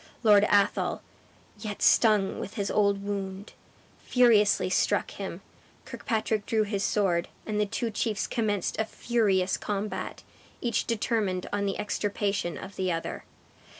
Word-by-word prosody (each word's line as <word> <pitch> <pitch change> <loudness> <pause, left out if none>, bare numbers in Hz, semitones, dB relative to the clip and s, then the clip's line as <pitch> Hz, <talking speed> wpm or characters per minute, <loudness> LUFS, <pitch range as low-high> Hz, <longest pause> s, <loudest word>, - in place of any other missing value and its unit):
Lord 210 -2 +6
Athol, 200 -1 +2 0.6
yet 210 -2 -5
stung 210 -4 +4
with 200 - -6
his 200 -1 -2
old 200 -1 +2
wound, 200 0 -5 0.5
furiously 230 -5 +4
struck - - +1
him; - - -6 0.4
Kirkpatrick 220 -2 -2
drew 220 -1 +2
his 200 -1 -2
sword, 180 -5 +1 0.2
and 210 -1 -1
the 210 - +1
two 230 +3 -2
chiefs 215 0 -1
commenced 210 -5 -1
a 220 - +2
furious 205 -5 +1
combat, 205 0 -4 0.4
each 235 -3 -1
determined 210 -5 -1
on 200 0 0
the 195 - -2
extirpation 205 -3 -2
of 195 +1 -9
the 185 -1 0
other. 165 -1 -4
205 Hz, 135 wpm, -28 LUFS, 195-215 Hz, 0.6 s, Lord